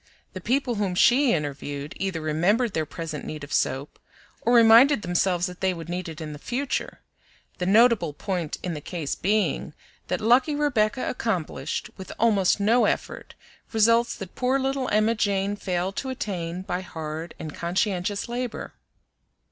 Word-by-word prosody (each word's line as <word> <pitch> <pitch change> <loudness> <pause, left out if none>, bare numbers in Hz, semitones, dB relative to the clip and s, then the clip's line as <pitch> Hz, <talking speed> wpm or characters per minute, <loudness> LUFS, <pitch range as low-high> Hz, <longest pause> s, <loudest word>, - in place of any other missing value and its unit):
The - - -7
people 260 0 0
whom 190 -3 -1
she 250 +7 +5
interviewed 145 -1 -3
either 190 -4 -2
remembered 190 +9 +1
their 160 -1 -1
present 155 -2 -6
need 155 -1 -6
of 145 -1 -7
soap, 135 +2 -1 0.4
or 235 - +1
reminded 235 +2 +7
themselves 175 0 +1
that 180 -1 -7
they 190 -1 +1
would 165 0 -8
need 180 0 -3
it 160 0 -8
in 155 -2 -6
the 145 - -9
future; 255 - -3 0.6
the 180 - -1
notable 220 -5 +4
point 175 +1 -3
in 180 - -2
the 150 - -6
case 160 -2 -4
being 210 +3 0 0.3
that - - -1
lucky 250 +7 +3
Rebecca 255 -5 +1
accomplished, 170 - -3
with 190 - -8
almost 210 -4 +3
no 225 +5 +4
effort, - - -3 0.4
results 230 +2 +3
that 190 -2 -8
poor 255 +2 +1
little 270 -1 -1
Emma 215 +2 +3
Jane 200 -2 0
failed 185 -1 -2
to 265 - -3
attain 185 -9 -4
by 180 -1 -3
hard 160 -2 -6
and 155 -2 -7
conscientious 185 +2 -1
labor. 240 0 -4
195 Hz, 160 wpm, -25 LUFS, 165-230 Hz, 0.6 s, reminded